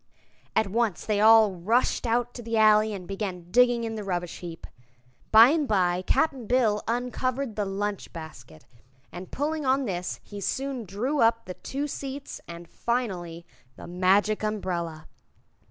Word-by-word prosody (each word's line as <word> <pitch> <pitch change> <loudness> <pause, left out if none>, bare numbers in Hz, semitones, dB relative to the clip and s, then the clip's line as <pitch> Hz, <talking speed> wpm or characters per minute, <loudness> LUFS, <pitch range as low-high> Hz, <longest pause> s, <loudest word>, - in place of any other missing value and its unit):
At 220 - +3
once 210 -2 -1
they 210 -1 +1
all 220 -2 +7
rushed 225 +8 0
out 240 +1 0
to 245 - -8
the 230 -1 -2
alley 215 0 +5
and 190 -4 -7
began 190 -3 -5
digging 245 0 +4
in 225 -1 -3
the 215 -1 -5
rubbish 175 -3 -3
heap. 170 -2 -8 0.7
By 225 +3 +9
and 305 -1 +1
by 180 -4 +1
Cap'n 270 -5 +1
Bill 225 -4 +2
uncovered 250 +1 -2
the 210 - -1
lunch 200 +1 -3
basket, 120 - -11 0.5
and 180 +1 -9
pulling 305 +2 -2
on 265 0 +2
this 180 -4 -4
he 205 -1 -9
soon 265 +2 -3
drew 240 +10 -2
up 230 -1 +3
the 180 - -6
two 275 +9 -4
seats 275 0 -6
and, 170 0 -9
finally, 180 -8 -3 0.3
the - - -11
Magic 190 +4 +2
Umbrella. 175 -7 -3
215 Hz, 155 wpm, -26 LUFS, 185-245 Hz, 0.7 s, By